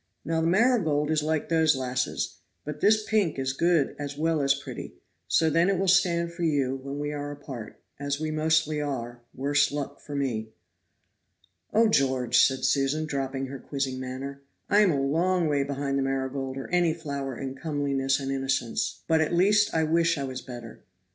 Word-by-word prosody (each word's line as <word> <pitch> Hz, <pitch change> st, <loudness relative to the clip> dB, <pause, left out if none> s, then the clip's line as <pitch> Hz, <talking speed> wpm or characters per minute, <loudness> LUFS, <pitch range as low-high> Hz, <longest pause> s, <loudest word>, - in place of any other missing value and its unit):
Now 165 Hz, +1 st, 0 dB
the 165 Hz, -, +1 dB
marigold 170 Hz, -, +2 dB
is 155 Hz, -1 st, +2 dB
like 155 Hz, 0 st, -1 dB
those 160 Hz, -2 st, +4 dB
lasses; 125 Hz, -1 st, -2 dB, 0.3 s
but 150 Hz, 0 st, -6 dB
this 215 Hz, +1 st, +4 dB
pink 200 Hz, -8 st, +1 dB
is 130 Hz, -1 st, -1 dB
good 165 Hz, -1 st, +2 dB
as 145 Hz, -1 st, -5 dB
well 160 Hz, 0 st, +1 dB
as 140 Hz, 0 st, +3 dB
pretty, 140 Hz, -, -8 dB, 0.3 s
so 160 Hz, -, +3 dB
then 165 Hz, +4 st, +3 dB
it 195 Hz, -, +2 dB
will 195 Hz, +1 st, 0 dB
stand 170 Hz, -3 st, +3 dB
for 170 Hz, -, -8 dB
you, 140 Hz, -5 st, +1 dB
when 140 Hz, +1 st, -6 dB
we 145 Hz, 0 st, -3 dB
are 145 Hz, 0 st, -4 dB
apart, 130 Hz, -7 st, -8 dB, 0.2 s
as 140 Hz, 0 st, -2 dB
we 155 Hz, 0 st, -2 dB
mostly 155 Hz, -1 st, +1 dB
are 120 Hz, -4 st, -4 dB
worse 140 Hz, +2 st, +1 dB
luck 145 Hz, -1 st, -4 dB
for 145 Hz, -, -7 dB
me." 120 Hz, -6 st, -2 dB, 1.2 s
"Oh, 225 Hz, +1 st, +4 dB
George," 130 Hz, -, +2 dB
said 130 Hz, -1 st, +3 dB
Susan, 140 Hz, +3 st, +1 dB
dropping 135 Hz, -2 st, -3 dB
her 135 Hz, 0 st, -7 dB
quizzing 135 Hz, -2 st, -3 dB
manner, 135 Hz, +2 st, -6 dB, 0.3 s
"I 205 Hz, -, +6 dB
am 205 Hz, -4 st, +5 dB
a 140 Hz, -, 0 dB
long 170 Hz, +6 st, +1 dB
way 145 Hz, -2 st, +1 dB
behind 140 Hz, 0 st, -2 dB
the -, -, +1 dB
marigold 135 Hz, 0 st, -2 dB
or 135 Hz, -, -5 dB
any 175 Hz, -2 st, +2 dB
flower 140 Hz, -5 st, -5 dB
in 135 Hz, -1 st, -4 dB
comeliness 140 Hz, -2 st, -1 dB
and 135 Hz, -1 st, -3 dB
innocence, 135 Hz, -4 st, -1 dB
but 160 Hz, -1 st, +3 dB
at 160 Hz, +2 st, 0 dB
least 205 Hz, +4 st, +4 dB
I 160 Hz, -, +1 dB
wish 165 Hz, +1 st, +2 dB
I 140 Hz, -, -2 dB
was 130 Hz, -1 st, -5 dB
better." 120 Hz, -3 st, -10 dB
145 Hz, 185 wpm, -27 LUFS, 135-160 Hz, 1.2 s, I